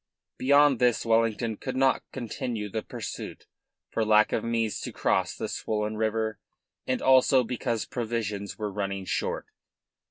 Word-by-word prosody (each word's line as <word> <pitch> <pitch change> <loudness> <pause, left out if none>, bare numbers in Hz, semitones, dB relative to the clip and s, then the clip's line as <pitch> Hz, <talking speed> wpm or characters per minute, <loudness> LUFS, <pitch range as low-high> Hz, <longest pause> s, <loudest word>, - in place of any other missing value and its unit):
Beyond 140 -1 +5
this 120 -2 +2
Wellington 115 -1 +1
could 130 -1 -5
not 135 0 +3
continue 115 -3 -4
the 110 - -2
pursuit - - -7 0.5
for 115 - 0
lack 110 0 +4
of 110 - 0
means 115 -2 0
to - - -5
cross - - 0
the - - -3
swollen 105 0 -2
river 110 -1 -1 0.5
and 130 - -1
also 130 0 +5
because 120 -2 -2
provisions 110 -4 -3
were 105 -1 -3
running 100 -1 -3
short. - - -2
115 Hz, 140 wpm, -27 LUFS, 105-125 Hz, 0.5 s, Beyond